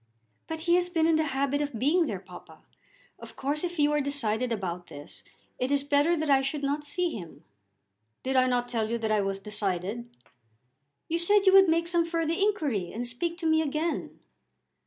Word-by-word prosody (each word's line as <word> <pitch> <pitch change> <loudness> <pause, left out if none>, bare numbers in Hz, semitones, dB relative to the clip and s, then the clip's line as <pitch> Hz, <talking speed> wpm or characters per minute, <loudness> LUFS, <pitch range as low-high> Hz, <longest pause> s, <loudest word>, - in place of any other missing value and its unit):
"But 320 0 -5
he 340 +1 +2
has 355 0 +1
been 325 -3 +1
in 325 -1 +4
the 315 - +1
habit 280 0 0
of 285 -5 -3
being 310 +8 +2
there, 205 - -3
papa. 180 -1 -14 0.6
Of - - -11
course 290 +4 -2
if 350 -1 -3
you 295 0 +3
are 295 0 +2
decided 255 -4 -1
about 180 -5 -4
this, 145 0 -11 0.4
it 255 +2 -1
is 285 -1 +2
better 290 +4 +2
that 315 0 -2
I 275 -2 +4
should 280 +2 -3
not 285 +2 -1
see 345 +4 -1
him." 175 - -9 0.8
"Did 265 +1 -1
I 255 0 +4
not 245 -1 0
tell 225 -3 -2
you 235 - 0
that 220 -1 -2
I 215 -1 +3
was 195 0 -2
decided?" 205 +2 -3 1.0
"You 335 +1 -1
said 405 +4 +3
you 380 - +6
would 385 -2 +7
make 335 +1 +2
some 340 -1 +1
further 330 -1 -1
inquiry 310 - 0
and 240 +3 -4
speak 335 +8 -3
to - - -4
me 315 0 +3
again." 315 +2 -3
285 Hz, 200 wpm, -28 LUFS, 230-330 Hz, 1.0 s, would